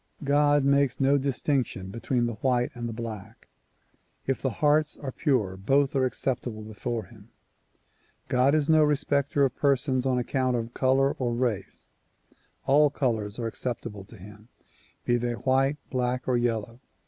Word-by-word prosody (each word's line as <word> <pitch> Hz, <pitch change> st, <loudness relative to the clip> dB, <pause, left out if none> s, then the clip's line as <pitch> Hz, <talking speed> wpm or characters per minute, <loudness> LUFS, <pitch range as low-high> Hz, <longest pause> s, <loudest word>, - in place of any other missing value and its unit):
God 145 Hz, 0 st, +3 dB
makes 140 Hz, -2 st, +2 dB
no 140 Hz, +1 st, +3 dB
distinction 130 Hz, -7 st, -1 dB
between 120 Hz, +2 st, -1 dB
the 120 Hz, -, -2 dB
white 125 Hz, +2 st, 0 dB
and 120 Hz, -2 st, -5 dB
black. 110 Hz, -2 st, -8 dB, 0.8 s
If 135 Hz, -, -1 dB
the 135 Hz, -, 0 dB
hearts 150 Hz, +5 st, +1 dB
are 135 Hz, -3 st, -5 dB
pure 125 Hz, -, 0 dB
both 135 Hz, +9 st, +1 dB
are 130 Hz, -1 st, +3 dB
acceptable 125 Hz, -4 st, -3 dB
before 110 Hz, +2 st, -4 dB
him. 110 Hz, -2 st, -17 dB, 1.0 s
God 130 Hz, +2 st, +3 dB
is 150 Hz, -2 st, +1 dB
no 155 Hz, -1 st, +5 dB
respecter 145 Hz, -1 st, +1 dB
of 130 Hz, -, -2 dB
persons 135 Hz, -2 st, +1 dB
on 130 Hz, -1 st, +1 dB
account 130 Hz, 0 st, 0 dB
of 115 Hz, +1 st, -5 dB
color 135 Hz, +1 st, +2 dB
or 120 Hz, -2 st, -1 dB
race. 115 Hz, -6 st, -3 dB, 0.8 s
All 145 Hz, +2 st, +5 dB
colors 110 Hz, -7 st, -2 dB
are 120 Hz, -, -3 dB
acceptable 115 Hz, -3 st, -4 dB
to 110 Hz, -, -14 dB
him, 105 Hz, +3 st, -13 dB, 0.6 s
be 120 Hz, -, +2 dB
they 120 Hz, 0 st, -2 dB
white, 135 Hz, +4 st, +1 dB
black 125 Hz, 0 st, -1 dB
or 130 Hz, -, +2 dB
yellow. 115 Hz, -1 st, -1 dB
125 Hz, 150 wpm, -27 LUFS, 115-140 Hz, 1.0 s, no